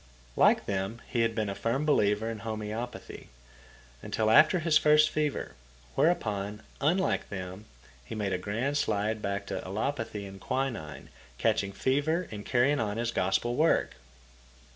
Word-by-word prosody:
Like - - +4
them 100 +3 -2
he 120 - 0
had 115 -1 +1
been 110 -2 0
a 100 - -2
firm 120 +8 -1
believer 105 -7 +2
in 115 -1 -4
homeopathy, 110 +2 -6 0.7
until 110 0 0
after 155 +8 +6
his 165 -2 +1
first 155 0 +5
fever, 150 -2 -2 0.4
whereupon, 105 - 0 0.2
unlike 180 +7 +1
them, 95 +1 -6 0.4
he 85 - -7
made 105 -3 -1
a 90 - -1
grand 115 +10 -1
slide 105 -2 0
back 100 0 -2
to - - -4
allopathy 110 0 -3
and 95 -1 -10
quinine, 120 - -3 0.3
catching 100 +10 +1
fever 145 - 0
and 105 -1 -7
carrying 135 +4 +3
on 105 -1 -1
his 115 0 -1
Gospel 115 +5 0
work. 155 - +2
110 Hz, 145 wpm, -29 LUFS, 100-140 Hz, 0.7 s, after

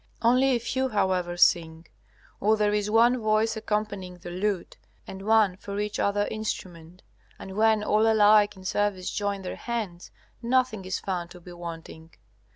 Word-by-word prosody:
Only 255 +3 +4
a - - 0
few, 260 +3 -2
however, 185 -5 0
sing; 165 -2 +2 0.5
or 215 +2 +2
there 210 -1 +1
is 210 0 0
one 235 +3 +4
voice 215 0 +1
accompanying 210 -4 -3
the 175 0 -9
lute 190 0 -3 0.3
and 190 - -9
one 210 -3 +3
for 200 +1 -6
each 210 0 -3
other 205 0 +1
instrument. 180 -5 -6 0.3
And 190 - -9
when 220 0 +3
all 215 +1 +3
alike 210 -1 +5
in 185 - -13
service 200 -2 -1
join 200 -1 -2
their 180 - -5
hands, 215 -8 -5 0.3
nothing 240 -5 0
is 185 - -2
found 180 -3 -4
to 180 - -12
be 175 0 -12
wanting. 165 -1 -9
205 Hz, 165 wpm, -26 LUFS, 180-220 Hz, 0.5 s, alike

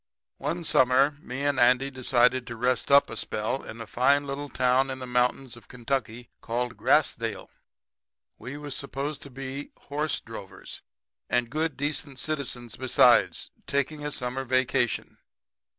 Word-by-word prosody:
"One 165 +5 -2
summer 130 -1 +4
me 135 +1 -4
and 145 -2 +1
Andy 125 +3 +4
decided 130 -1 +2
to 115 - -6
rest 125 +1 0
up 140 0 +7
a - - -7
spell 110 +5 -2
in 110 - -9
a 115 - -6
fine 140 +6 +2
little 140 +1 -5
town 130 +1 +2
in 130 - -4
the 130 - -6
mountains 125 +1 0
of 115 -4 -16
Kentucky 120 -2 -3
called 120 +1 -2
Grassdale. 105 - +1 0.9
We 130 +6 -7
was 145 -2 -5
supposed 140 +1 -4
to 140 - -10
be 135 +2 -7
horse 150 +1 -2
drovers, 110 -4 -9 0.5
and 120 -1 +1
good 155 0 -1
decent 145 -1 -3
citizens 130 -6 -4
besides, 130 0 +4 0.2
taking 140 +2 -1
a 150 - -2
summer 130 0 -3
vacation. 130 -1 0
130 Hz, 150 wpm, -27 LUFS, 125-140 Hz, 0.9 s, up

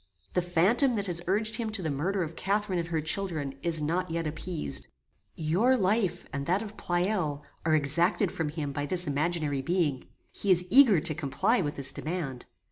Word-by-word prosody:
"The 180 - +2
phantom 190 - +3
that 200 -2 -1
has 175 -3 -1
urged 215 +4 +2
him 230 -2 -2
to 200 -4 0
the 160 - -1
murder 180 +7 -1
of 165 0 -7
Catharine 200 -1 -1
and 170 - -3
her 165 -2 -1
children 155 -4 -1
is 160 -2 -1
not 175 +4 -1
yet 165 0 -2
appeased. 155 - -4 0.5
Your 190 +12 +2
life, 200 -1 0
and 140 0 -4
that 190 +5 +1
of 215 -1 -9
Pleyel, 175 -5 -1 0.2
are 155 - +4
exacted 170 +6 +2
from 160 -3 -2
him 150 -2 -4
by 145 +1 -3
this 180 +1 0
imaginary 150 -1 -1
being. 150 -4 0 0.3
He 200 - -4
is 180 -1 +6
eager 245 - +7
to 155 - +3
comply 155 - 0
with 145 -3 -3
this 135 -1 +3
demand. 150 -7 -5
170 Hz, 190 wpm, -28 LUFS, 150-195 Hz, 0.5 s, eager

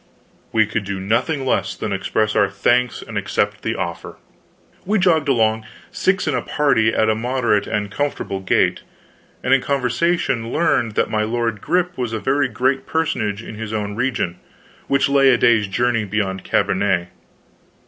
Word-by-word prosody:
We 110 -1 +3
could 110 0 -3
do 100 -1 -4
nothing 125 +8 0
less - - 0
than 105 - -3
express 110 +2 -1
our 100 - +3
thanks 120 +5 +1
and - - -4
accept - - -1
the - - -2
offer. - - -5 0.7
We 210 +3 +1
jogged 165 -6 +2
along, 110 -3 +2 0.3
six 190 -2 0
in 150 - +1
the 125 - 0
party, 115 -7 +2
at 110 - +1
a 110 - +3
moderate 120 -2 0
and 105 -2 -2
comfortable 140 -7 -2
gait, 95 - +1 0.6
and 130 - +2
in 135 - +4
conversation 135 -2 0
learned 150 -9 +1
that - - 0
my 110 - +1
lord 115 -1 -1
Grip 180 -2 0
was 120 -3 -2
a 110 - -1
very 135 +4 +1
great 130 +4 -1
personage 115 -10 -1
in - - -8
his 110 0 -6
own 105 -1 -3
region, 115 -8 -1 0.5
which 140 0 +2
lay 140 -1 +4
a 125 - +5
day's 110 -4 +3
journey 115 +3 0
beyond 95 -2 -2
Cambenet. 90 -3 0
115 Hz, 170 wpm, -20 LUFS, 105-135 Hz, 0.7 s, a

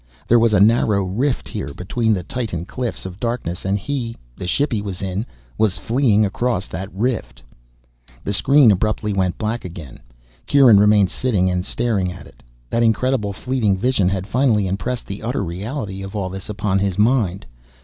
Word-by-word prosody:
There 120 - +5
was 115 0 +3
a 105 - +4
narrow 105 -1 +4
rift 120 +9 -1
here 70 - -5
between 110 +5 -1
the 95 -4 0
titan 110 -8 -4
cliffs 125 0 -4
of 95 +1 -8
darkness 115 -8 -3
and 95 +1 +1
he 120 0 -4 0.2
the 90 - -6
ship 140 +10 +1
he 110 -3 0
was 100 -2 -5
in 95 +4 -3 0.3
was 110 -4 +2
fleeing 115 -4 +2
across 105 0 -1
that 95 +3 -6
rift. 95 - -3 0.8
The 100 - -2
screen 135 +3 +5
abruptly 105 +1 0
went 95 -2 0
black 110 +2 -2
again. 80 -7 -9 0.5
Kieran 130 -8 +6
remained 105 -2 +4
sitting 100 -8 +1
and 90 0 -1
staring 105 -4 0
at 90 -1 -10
it. - - -18 0.3
That 115 - +1
incredible 115 -1 +1
fleeting 110 -2 0
vision 105 -3 +2
had 95 -1 -2
finally 115 -3 +2
impressed 100 +7 -3
the 100 0 -7
utter 115 0 -2
reality 95 - -5
of 95 +2 -7
all 95 -3 -2
this 95 +2 -7
upon 100 -1 0
his 95 -2 -1
mind. 105 - +2
105 Hz, 180 wpm, -20 LUFS, 95-120 Hz, 0.8 s, Kieran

